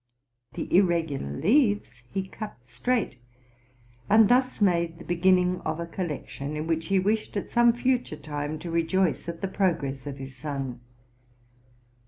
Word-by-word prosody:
The - - -2
ir 185 - +8
regular 160 - -1
leaves 205 - +2
he 190 -1 -2
cut 190 - -8
straight, 125 - -1 0.9
and 220 0 +6
thus 255 +1 +3
made 170 -4 +2
the 170 - -11
begin 175 +2 +4
ning 180 0 0
of 155 +1 -2
a 170 - -2
collection, 150 -4 -5
in 155 - -3
which 165 0 -1
he 195 - +2
wished, 210 +3 0
at 200 - -4
some 240 0 +5
future 245 -8 0
time, 150 0 -4
to 170 +2 -6
rejoice 170 +2 +1
at 170 -1 -6
the 195 - 0
progress 145 -9 -1
of 140 -1 -5
his 135 -1 -8
son. 135 -3 -4
170 Hz, 160 wpm, -27 LUFS, 145-195 Hz, 0.9 s, ir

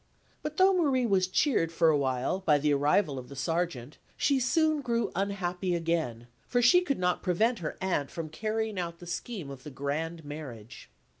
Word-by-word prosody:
But 305 0 -5
though 380 +1 +6
Marie 280 -8 +2
was 190 -4 +2
cheered 185 - +1
for 165 -1 +3
a 155 - +4
while 130 +5 0
by 155 -6 +3
the 145 0 +2
arrival 145 +1 +2
of 125 - -11
the 140 - -9
Sergeant, 150 -2 -2 0.2
she 280 -2 +2
soon 310 +3 +2
grew 235 -4 -1
unhappy 185 -2 -1
again; 160 -9 -1 0.2
for 245 - +1
she 245 +9 +6
could 285 -7 -1
not 180 -1 0
prevent 215 +6 +1
her 155 -3 -5
aunt 175 -7 0
from 165 -2 -5
carrying 215 +4 -2
out 170 -1 -4
the 175 - -12
scheme 175 - -5
of 135 -2 -9
the 150 - -9
grand 155 +4 -4
marriage. 135 -7 -9
175 Hz, 190 wpm, -29 LUFS, 150-225 Hz, 0.2 s, though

